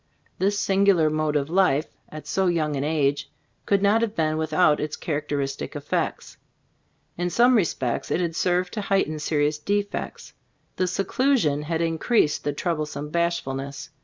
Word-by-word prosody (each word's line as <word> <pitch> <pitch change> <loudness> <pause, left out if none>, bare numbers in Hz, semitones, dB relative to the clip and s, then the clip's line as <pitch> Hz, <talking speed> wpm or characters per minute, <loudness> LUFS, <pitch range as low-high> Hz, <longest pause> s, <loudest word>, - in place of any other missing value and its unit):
This 200 +2 +1
singular 190 -5 +3
mode 155 -1 0
of 140 -1 +1
life, 160 -4 +1
at 155 0 -9
so 190 -1 0
young 155 -4 0
an 135 - -2
age, 145 -2 0 0.4
could 200 -1 +2
not 210 +3 +4
have 225 -2 -1
been 155 -1 +1
without 155 0 +2
its 150 0 -3
characteristic 145 -3 -3
effects. - - -3 0.8
In 175 0 0
some 245 +7 +4
respects 155 - 0
it - - 0
had 170 -2 -2
served 180 +1 0
to 215 - -3
height 195 -1 +1
en 155 0 -5
serious 150 0 0
defects. 205 +5 -3 0.4
The 185 - +1
seclusion 195 - +1
had 160 +2 -2
increased 165 +1 +1
the 145 - 0
troublesome 150 -2 -3
bashfulness. 140 -5 -2
160 Hz, 155 wpm, -24 LUFS, 150-190 Hz, 0.8 s, not